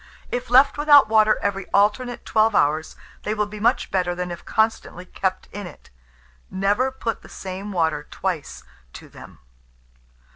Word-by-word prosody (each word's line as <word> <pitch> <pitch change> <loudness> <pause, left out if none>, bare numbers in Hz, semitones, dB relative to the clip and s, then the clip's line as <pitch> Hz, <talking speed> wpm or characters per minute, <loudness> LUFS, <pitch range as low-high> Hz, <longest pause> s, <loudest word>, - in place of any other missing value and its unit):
If 245 0 -4
left 270 +4 +5
without 290 -5 +6
water 215 -1 +4
every 195 -1 -2
alternate 235 +5 +1
12 220 -1 +2
hours, 155 +2 +1 0.3
they 215 - -3
will 210 0 0
be 210 +1 -9
much 235 +5 +1
better 180 -2 0
than 180 0 -4
if 170 - -8
constantly 220 -5 -1
kept 185 0 -3
in 205 -2 -7
it. 165 - -15 0.6
Never 200 +7 +1
put 235 -3 -4
the - - -15
same 190 +2 -7
water 160 -5 -1
twice 180 -6 -4 0.3
to - - -11
them. - - -14
205 Hz, 155 wpm, -22 LUFS, 185-225 Hz, 0.6 s, without